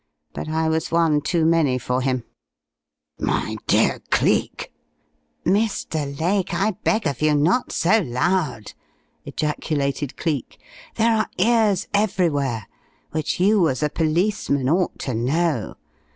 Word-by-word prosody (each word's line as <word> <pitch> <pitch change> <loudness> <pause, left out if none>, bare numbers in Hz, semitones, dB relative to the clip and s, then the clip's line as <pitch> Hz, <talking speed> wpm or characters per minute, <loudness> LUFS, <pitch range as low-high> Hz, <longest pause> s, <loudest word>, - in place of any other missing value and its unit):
But - - -5
I 160 +1 0
was 160 0 0
one 165 -3 +3
too 165 +1 0
many 160 -6 +3
for 125 +1 -1
him 130 -2 -1 0.5
" - - -63
"My - - -1
dear - - +3
Cleek!" - - 0 0.7
"Mr. 160 -7 -1
Lake, 185 +3 0
I 210 +3 +1
beg 220 -2 +1
of 140 -3 -2
you 155 -1 +3
not 170 - +2
so 190 +7 +3
loud!" 140 - -1 0.5
ejaculated 145 -2 -2
Cleek. 150 -7 -3 0.4
"There 225 0 +3
are 215 - 0
ears 220 -5 +2
everywhere, 150 - 0 0.5
which 155 +1 -2
you 190 -3 +4
as 130 +3 -2
a 150 - 0
policeman 160 -4 0
ought 175 +6 +1
to 130 - -3
know. 135 - 0
160 Hz, 130 wpm, -22 LUFS, 140-185 Hz, 0.7 s, you